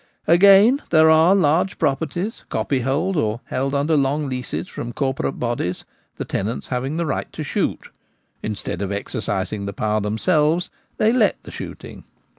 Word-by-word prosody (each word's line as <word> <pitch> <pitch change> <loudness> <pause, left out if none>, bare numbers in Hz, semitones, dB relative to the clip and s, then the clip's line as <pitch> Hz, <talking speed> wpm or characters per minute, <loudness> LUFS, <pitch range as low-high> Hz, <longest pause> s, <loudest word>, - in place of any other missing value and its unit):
Again, 200 - +6
there 160 -1 +6
are 160 +4 +5
large 180 +1 +2
properties, 160 - -2
copyhold, 140 +8 0
or 110 -3 -1
held 135 +2 -2
under 145 +3 +1
long 145 +1 +1
leases 130 +5 -4
from 120 -7 -6
corporate 135 0 -2
bodies, 120 -7 -2 0.3
the - - -5
tenants 110 +5 -3
having 130 +4 -2
the 170 - 0
right 145 - -3
to - - -5
shoot - - -2 0.5
Instead 105 -3 -4
of 100 -1 -2
exercising 100 0 -3
the 100 - -4
power 105 +1 0
themselves, 150 - +1 0.3
they 220 +2 +3
let 240 -4 +2
the - - -10
shooting. - - -9
140 Hz, 150 wpm, -21 LUFS, 115-170 Hz, 0.5 s, Again